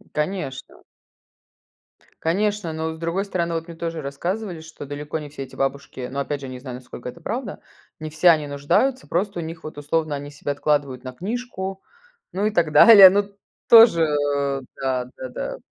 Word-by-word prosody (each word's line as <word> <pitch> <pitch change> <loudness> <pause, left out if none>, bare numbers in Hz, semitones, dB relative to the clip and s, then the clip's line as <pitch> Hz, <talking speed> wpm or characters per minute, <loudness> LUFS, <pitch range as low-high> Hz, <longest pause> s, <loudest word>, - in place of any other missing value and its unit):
Конечно. 150 -4 -4 1.4
Конечно, 195 0 0
но, 160 0 -3
с - - -11
другой 170 +4 -2
стороны, 170 -4 -2
вот 165 +1 -3
мне 170 - -9
тоже 165 -1 -4
рассказывали, 175 +6 -4
что 160 -2 -10
далеко 145 +2 -5
не 150 -1 -8
все 140 -2 -7
эти - - -12
бабушки, 135 -2 -3
ну, 140 - -3
опять 140 0 -3
же, 135 - -6
не 130 -1 -7
знаю, 125 -2 -7
насколько 125 -1 -9
это 170 - -13
правда, 240 +8 -4 0.4
не 155 0 -5
все 160 +3 +4
они 155 -3 +3
нуждаются. 145 - 0
Просто 190 +1 -1
у 170 - -3
них, 165 +1 -8
вот, 155 -1 -8
условно, 150 +1 -1
они 145 +1 -7
себе 145 0 -4
откладывают 140 -3 -1
на 130 - -6
книжку, 195 - -5 0.5
ну 195 +3 -1
и 215 - +2
так 165 -6 +1
далее. 195 +4 +10
Ну, 205 +2 +2
т 200 - -15 0.4
тоже, 225 -8 +8
э, 145 -2 0
да 130 -2 -1
да 130 - -6
да. - - -5
160 Hz, 185 wpm, -23 LUFS, 140-185 Hz, 1.4 s, далее